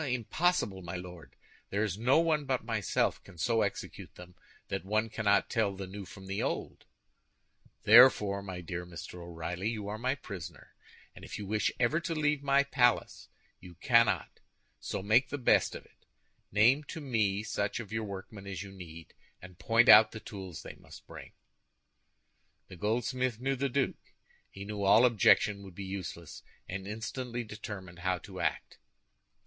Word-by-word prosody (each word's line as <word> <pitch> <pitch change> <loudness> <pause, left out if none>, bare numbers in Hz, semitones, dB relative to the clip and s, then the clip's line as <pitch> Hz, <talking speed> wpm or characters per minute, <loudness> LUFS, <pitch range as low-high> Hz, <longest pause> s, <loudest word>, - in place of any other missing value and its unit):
"Impossible, 125 - 0
my 85 0 -6
Lord! 90 -2 -9 0.3
There 100 +2 0
is 105 -5 -1
no 125 +8 +3
one 160 -3 +1
but 130 -3 -1
myself 110 -4 0
can 95 -3 -15
so 115 +6 +1
execute 100 - -4
them 90 0 -12 0.4
that - - -3
one 110 +3 0
cannot 100 -4 +2
tell 105 -3 0
the 95 0 -6
new 100 +1 -8
from 95 +1 -12
the 95 +1 -3
old." - - -4 1.0
"Therefore, 105 -4 +7
my 95 -2 -7
dear 90 +1 -5
Mr. 90 0 -9
O'Reilly, 85 +3 -4
you 105 -3 -4
are 105 +1 -5
my 130 +3 0
prisoner. 100 - -9 0.4
And - - -13
if - - -7
you 105 - -6
wish 105 +2 0
ever 125 +6 +2
to 170 -1 -3
leave 150 -2 +1
my 140 0 +3
palace, 125 -4 +1 0.3
you 90 -1 -13
cannot; 115 +4 +2 0.4
so - - -4
make 115 +5 +3
the 145 - -3
best 125 - +3
of - - -9
it. - - -28 0.4
Name 120 +9 +4
to 160 - -7
me 110 -8 0
such 105 -1 -2
of 105 -4 -8
your 110 0 -1
workmen 100 0 -8
as 100 0 -5
you 100 - -10
need, 85 -4 -11 0.3
and 90 -1 -13
point 115 +6 +3
out 110 +1 +9
the 110 - -6
tools 95 -7 -8
they - - -8
must - - -14
bring." - - -11 1.4
The - - -10
goldsmith 120 +4 -1
knew 135 +2 0
the 140 +1 -1
duke. 135 +1 -2 0.3
He 100 0 -9
knew 105 0 -5
all 105 +5 +6
objection 105 -3 +4
would 95 -3 -12
be 100 - -6
useless, 90 -4 -7 0.3
and 95 +1 -6
instantly 120 +3 -4
determined 100 -5 -8
how 95 0 0
to - - -10
act. - - -2
105 Hz, 170 wpm, -31 LUFS, 95-120 Hz, 1.4 s, out